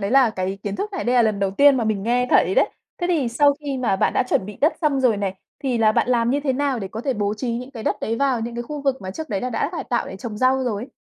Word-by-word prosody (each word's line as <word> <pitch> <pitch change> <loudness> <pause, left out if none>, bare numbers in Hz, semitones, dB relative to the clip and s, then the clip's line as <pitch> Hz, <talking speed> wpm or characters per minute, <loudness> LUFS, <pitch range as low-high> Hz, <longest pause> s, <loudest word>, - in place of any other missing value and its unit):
đấy 200 +1 -2
là 260 -3 +5
cái 190 0 -3
kiến 205 -1 -3
thức 415 0 -4
này 380 - -3
đây 245 - +1
là 245 - +5
lần 215 -3 +1
đầu 195 -1 0
tiên 280 +7 +5
mà 240 - 0
mình 215 -3 -1
nghe 245 +3 +1
thấy - - +4
đấy. - - +4 0.3
Thế 350 - -1
thì 315 -8 +1
sau 285 +5 +4
khi 280 -3 -3
mà 230 -6 +1
bạn - - +1
đã - - +2
chuẩn 220 -6 0
bị 210 - -8
đất 305 +4 +4
xong 290 -4 +1
rồi 245 -5 +3
này, 195 -2 -2 0.2
thì 255 -4 -1
là 215 -1 +4
bạn - - +1
làm 240 -1 +2
như 285 - +1
thế 280 -2 0
nào 275 -1 0
để 195 -3 -5
có 220 - -6
thể 265 +1 -1
bố 205 -1 -1
trí 235 +2 -3
những 250 +2 -6
cái 235 -5 -8
đất - - 0
đấy 225 +1 -1
vào 265 -3 +1
những 235 +1 -4
cái 240 - -3
khu 290 +3 -6
vực 270 -2 0
mà 185 - -5
trước 315 +11 -6
đấy 200 -4 -2
là 250 - -3
đã 245 +5 -1
cải 345 - -4
tạo 240 - -1
để - - -7
trồng 210 +1 -6
rau 260 +1 +2
rồi? 240 +2 -3
245 Hz, 330 wpm, -22 LUFS, 215-275 Hz, 0.3 s, là